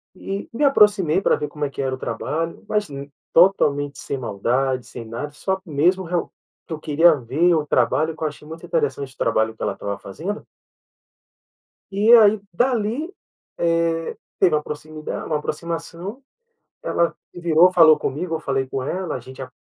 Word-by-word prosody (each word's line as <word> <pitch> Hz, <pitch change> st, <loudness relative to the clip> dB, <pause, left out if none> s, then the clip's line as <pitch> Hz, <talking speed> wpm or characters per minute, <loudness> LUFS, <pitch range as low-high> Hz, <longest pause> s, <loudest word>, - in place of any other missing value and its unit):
e 195 Hz, +2 st, -5 dB
me 265 Hz, -, -1 dB
aproximei 205 Hz, -, +4 dB
pra -, -, +3 dB
ver 150 Hz, -, -4 dB
como 150 Hz, 0 st, -3 dB
é -, -, -3 dB
que 140 Hz, -, -5 dB
era 130 Hz, -1 st, -1 dB
o -, -, -3 dB
trabalho, 165 Hz, +5 st, -3 dB
mas 210 Hz, -2 st, 0 dB, 0.5 s
totalmente 145 Hz, -6 st, +3 dB
sem 140 Hz, -, -4 dB
maldade, 125 Hz, +3 st, -1 dB
sem 120 Hz, -, -8 dB
nada, 115 Hz, +6 st, -6 dB
só 190 Hz, +5 st, -2 dB
mesmo 175 Hz, +5 st, +1 dB
real 175 Hz, 0 st, -2 dB, 0.3 s
que -, -, -18 dB
eu 155 Hz, -, -5 dB
queria 160 Hz, +3 st, +5 dB
ver 150 Hz, +8 st, +1 dB
o 155 Hz, -2 st, 0 dB
trabalho 145 Hz, +7 st, +1 dB
que 160 Hz, -, -7 dB
eu 155 Hz, -, +2 dB
achei 150 Hz, 0 st, -14 dB
muito 160 Hz, +1 st, -9 dB
interessante 440 Hz, -, -1 dB
o -, -, -27 dB
trabalho 110 Hz, -1 st, +1 dB
que -, -, -16 dB
ela 100 Hz, -, 0 dB
estava 100 Hz, 0 st, -5 dB
fazendo. 160 Hz, -, -6 dB, 1.5 s
E 205 Hz, +4 st, +3 dB
aí 215 Hz, -2 st, +7 dB
dali 245 Hz, -, 0 dB, 0.4 s
teve, 165 Hz, -1 st, 0 dB, 0.2 s
eh, 190 Hz, -, +7 dB
uma 150 Hz, -1 st, +1 dB
proximida 155 Hz, +1 st, -6 dB
uma 155 Hz, -, 0 dB
aproximação, 170 Hz, -, -5 dB, 0.6 s
ela 170 Hz, 0 st, +1 dB, 0.2 s
virou 175 Hz, +1 st, +4 dB
falou 160 Hz, -4 st, +7 dB
comigo, 160 Hz, +4 st, -3 dB
eu 160 Hz, -, -7 dB
falei 135 Hz, -2 st, -1 dB
com 135 Hz, -, -3 dB
ela 180 Hz, +6 st, -3 dB
a -, -, -6 dB
gente 130 Hz, +2 st, -10 dB
a 130 Hz, -, -8 dB
160 Hz, 175 wpm, -22 LUFS, 140-185 Hz, 1.5 s, aí